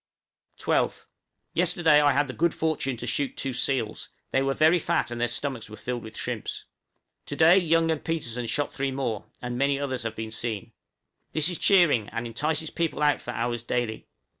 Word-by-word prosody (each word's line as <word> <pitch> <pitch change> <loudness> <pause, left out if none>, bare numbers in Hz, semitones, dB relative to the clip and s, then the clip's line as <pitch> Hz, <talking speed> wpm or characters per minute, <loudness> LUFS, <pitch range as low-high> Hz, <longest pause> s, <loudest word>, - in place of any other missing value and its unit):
12th. - - 0 0.5
Yesterday 160 -4 +4
I 145 -1 +5
had 145 +2 +2
the 130 - -6
good 170 +3 +1
fortune 150 -5 -1
to 120 - -4
shoot 135 +3 -1
two 135 - -2
seals; 125 -3 -1 0.2
they 135 - +2
were 135 0 0
very 160 +3 +5
fat 135 - 0
and 120 0 -4
their 120 - +3
stomachs 120 -1 -4
were 105 - -8
filled 125 -1 -4
with 110 -1 -10
shrimps. - - -4 0.6
To - - -4
day 165 +4 +7
Young 165 -2 +2
and 155 - -2
Petersen 125 -8 -2
shot 145 +4 -1
three 135 0 -1
more, 130 -6 -3 0.2
and 125 0 -3
many 140 0 +2
others 130 -3 -2
have 115 -1 -4
been 110 0 -5
seen. 115 0 -4 0.6
This 155 +2 +3
is 175 - -3
cheering, 165 - +4
and 115 +2 -4
entices 150 +7 -2
people 165 -2 -1
out 145 -1 +3
for - - -9
hours 120 -1 -2
daily. 120 -2 -2
135 Hz, 190 wpm, -26 LUFS, 120-155 Hz, 0.6 s, day